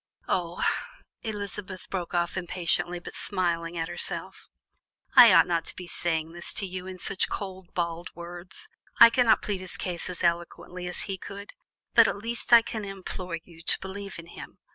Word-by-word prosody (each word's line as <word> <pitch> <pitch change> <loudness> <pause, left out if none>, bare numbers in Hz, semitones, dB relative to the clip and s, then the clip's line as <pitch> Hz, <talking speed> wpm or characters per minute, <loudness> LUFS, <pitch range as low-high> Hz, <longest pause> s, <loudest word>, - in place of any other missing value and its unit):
Oh!" 175 -2 -1 0.6
Elizabeth 205 -3 -6
broke 180 -2 -3
off 170 0 0
impatiently, 175 -1 0
but 175 - -9
smiling 170 -3 -1
at 165 0 -1
herself - - -5 0.7
"I 245 -3 +11
ought - - +7
not 170 -1 0
to - - -4
be 180 - -7
saying 165 -2 -1
this 175 +1 -4
to 200 - 0
you 185 0 -6
in 190 - -6
these 190 +2 +2
cold, 190 -2 -6
bald 170 -1 -2
words; 175 +2 -8 0.3
I 230 0 +11
cannot 245 -1 +4
plead 205 -3 -2
his 185 -2 +2
case 175 -2 -3
as 180 0 -5
eloquently 175 +1 -1
as 180 - -4
he 195 -2 -4
could; 200 +2 -9 0.4
but - - +7
at - - -1
least 230 +4 -4
I 235 -1 +9
can 220 -1 -5
implore 185 -3 -5
you 165 -2 -15
to 165 - +5
believe 195 +1 -7
in 170 - -9
him. 170 - -11
180 Hz, 180 wpm, -27 LUFS, 170-195 Hz, 0.7 s, I